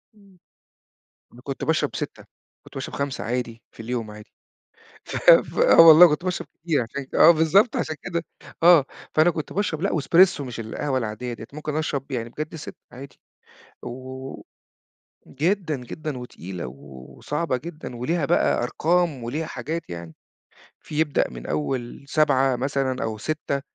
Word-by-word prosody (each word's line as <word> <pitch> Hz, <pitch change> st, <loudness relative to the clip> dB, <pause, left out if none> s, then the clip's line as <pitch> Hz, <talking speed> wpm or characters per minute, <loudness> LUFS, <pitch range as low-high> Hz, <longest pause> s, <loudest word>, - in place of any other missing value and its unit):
امم. 200 Hz, -3 st, -22 dB, 1.0 s
أنا 120 Hz, -, -15 dB
كنت 135 Hz, 0 st, -5 dB
باشرب 160 Hz, 0 st, 0 dB
6، -, -, -6 dB, 0.4 s
كنت -, -, -16 dB
باشرب -, -, -6 dB
5 140 Hz, -1 st, -3 dB
عادي 115 Hz, -1 st, -3 dB
في -, -, -14 dB
اليوم 115 Hz, -2 st, -4 dB
عادي، 105 Hz, +1 st, -13 dB, 0.7 s
ف -, -, -6 dB, 0.4 s
ف -, -, -2 dB
آه -, -, +7 dB
والله 165 Hz, +1 st, +10 dB
كنت 150 Hz, +1 st, -1 dB
باشرب 180 Hz, -1 st, -2 dB
كتير 160 Hz, -4 st, -1 dB
عشان 130 Hz, +4 st, -6 dB
آه 170 Hz, -, +9 dB
بالضبط 170 Hz, +8 st, +3 dB
عشان 155 Hz, -, -2 dB
كده، 170 Hz, -2 st, -3 dB, 0.4 s
آه، 170 Hz, -5 st, +7 dB, 0.3 s
فأنا 155 Hz, +3 st, +5 dB
كنت 155 Hz, -2 st, -6 dB
باشرب 185 Hz, -5 st, -1 dB
لأ 195 Hz, -, 0 dB
وإسبريسو 170 Hz, +1 st, +4 dB
مش 125 Hz, -4 st, -7 dB
القهوة 130 Hz, +5 st, -2 dB
العادية 120 Hz, +1 st, -4 dB
ديّة، 115 Hz, -, -9 dB
ممكن 150 Hz, 0 st, -5 dB
أشرب 145 Hz, -3 st, -2 dB
يعني 115 Hz, -3 st, -3 dB
بجد 155 Hz, +6 st, -6 dB
6 155 Hz, -, -8 dB, 0.2 s
عادي، 135 Hz, +2 st, -12 dB, 0.6 s
و 130 Hz, +2 st, -8 dB, 0.9 s
جدًا، 165 Hz, +2 st, -1 dB
جدًا 135 Hz, +3 st, -6 dB
وتقيلة 95 Hz, -, -7 dB
و 60 Hz, -, -8 dB, 0.5 s
وصعبة 150 Hz, -2 st, -2 dB
جدًا، 150 Hz, -2 st, -8 dB
وليها 155 Hz, +7 st, -1 dB
بقى -, -, +2 dB
أرقام 160 Hz, +1 st, 0 dB
وليها 150 Hz, +7 st, -3 dB
حاجات 155 Hz, -, -5 dB
يعني، 85 Hz, -2 st, -8 dB, 0.7 s
في 150 Hz, -, -6 dB
يبدأ 155 Hz, -3 st, +1 dB
من -, -, -10 dB
أول 120 Hz, -, -3 dB
7 135 Hz, -3 st, +3 dB
مثلًا 135 Hz, 0 st, -1 dB
أو 110 Hz, -1 st, -3 dB
6، 140 Hz, +2 st, -3 dB
140 Hz, 155 wpm, -24 LUFS, 125-160 Hz, 1.0 s, والله